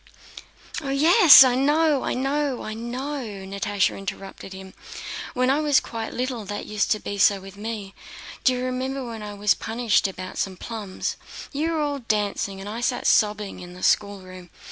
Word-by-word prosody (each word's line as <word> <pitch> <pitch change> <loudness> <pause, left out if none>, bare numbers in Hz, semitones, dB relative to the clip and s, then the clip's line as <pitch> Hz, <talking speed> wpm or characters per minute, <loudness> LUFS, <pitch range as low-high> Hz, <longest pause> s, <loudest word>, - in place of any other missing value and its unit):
"Oh 280 - -5
yes, 315 +3 +8
I 255 -2 +3
know, 295 +2 +2
I - - -1
know, 275 0 -1
I 215 - -5
know!" 255 +6 -4
Natásha 200 -1 -2
interrupted 195 0 -7
him. 190 0 -10 0.6
"When 255 +1 +2
I 280 - +2
was 295 -3 +4
quite 225 -1 -6
little 250 -2 -3
that 205 +1 -5
used 210 0 -1
to 215 - +2
be 205 -1 -5
so 200 0 +4
with 195 +1 -12
me. 205 -2 -6 0.5
Do 255 - +4
you 250 0 -3
remember 260 +1 -3
when 230 -2 -7
I 210 -1 -7
was 205 0 +3
punished 225 -2 0
once 190 - -8
about 185 0 -8
some 190 -2 -2
plums? 210 -4 -5 0.4
You 315 +4 -1
were 315 - 0
all 290 -1 -1
dancing, 205 -4 -2
and 195 - -8
I 225 +3 -5
sat 245 0 -1
sobbing 210 -2 +2
in 180 0 -10
the 180 - -11
schoolroom? 185 -3 -1
225 Hz, 185 wpm, -24 LUFS, 200-265 Hz, 0.6 s, yes